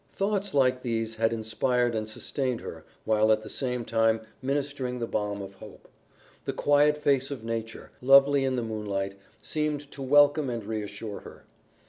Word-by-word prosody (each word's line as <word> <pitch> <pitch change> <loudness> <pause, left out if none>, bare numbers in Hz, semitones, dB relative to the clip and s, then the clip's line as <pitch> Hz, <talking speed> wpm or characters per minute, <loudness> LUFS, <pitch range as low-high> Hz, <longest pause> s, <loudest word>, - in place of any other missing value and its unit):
Thoughts 200 -2 -1
like 130 -2 +3
these 115 -2 -2
had 115 0 +2
inspired 120 +2 0
and 110 -1 -2
sustained 130 +2 -2
her 80 -1 -8 0.2
while 110 0 +3
at 110 0 +2
the 110 - -9
same 125 -3 -2
time 115 0 +2 0.2
ministering 135 -2 -2
the 120 - -2
balm 105 -2 -2
of 95 0 -9
hope. 95 - -14 0.6
The - - -2
quiet 145 +1 +3
face 140 -3 +1
of 135 -6 -6
nature, 115 -1 -5
lovely 135 +1 +6
in 130 -1 0
the 120 - -1
moonlight, 100 -3 -3 0.2
seemed 150 -2 -2
to 140 - -9
welcome 145 +1 +4
and 115 -3 -4
reassure 105 -1 -5
her. - - -13
120 Hz, 165 wpm, -27 LUFS, 110-140 Hz, 0.6 s, lovely